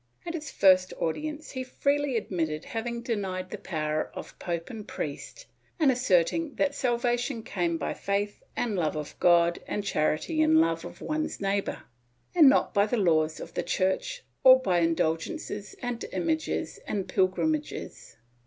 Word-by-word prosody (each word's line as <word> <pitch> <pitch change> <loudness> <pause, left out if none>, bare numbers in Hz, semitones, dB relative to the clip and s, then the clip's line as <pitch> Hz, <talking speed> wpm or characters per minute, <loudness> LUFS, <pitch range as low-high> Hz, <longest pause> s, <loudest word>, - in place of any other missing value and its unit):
At 340 - -4
his 310 -3 -5
first 185 -1 +4
audience 300 - -3
he 260 -1 -4
freely 280 0 0
admitted 165 -7 -2
having 235 +1 -4
denied 190 -5 -3
the 210 - -5
power 155 -3 -2
of - - -9
pope 170 +2 -4
and 220 -3 -8
priest 150 - -6 0.3
and 295 -4 +5
asserted 250 - +1
that 285 -1 +2
salvation 245 -1 0
came 170 -5 -1
by - - -2
faith 200 +1 -2
and 230 -4 -1
love 160 -5 0
of 150 -1 -5
God 170 -1 +4
and 205 - -2
charity 195 - 0
and 315 +1 +5
love 325 - +2
of - - -10
one's 310 0 -2
neighbor, 200 0 -1 0.5
and 320 -6 +8
not 275 - +2
by 200 -1 +3
the 245 - 0
laws 160 -5 +2
of - - -8
the - - -1
Church - - -1 0.2
or 260 0 +9
by 185 -9 +1
indulgences 170 - -1
and 245 -1 -3
images 320 -2 -1
and 200 -3 -2
pilgrimages. 165 -5 -1
205 Hz, 155 wpm, -28 LUFS, 170-270 Hz, 0.5 s, or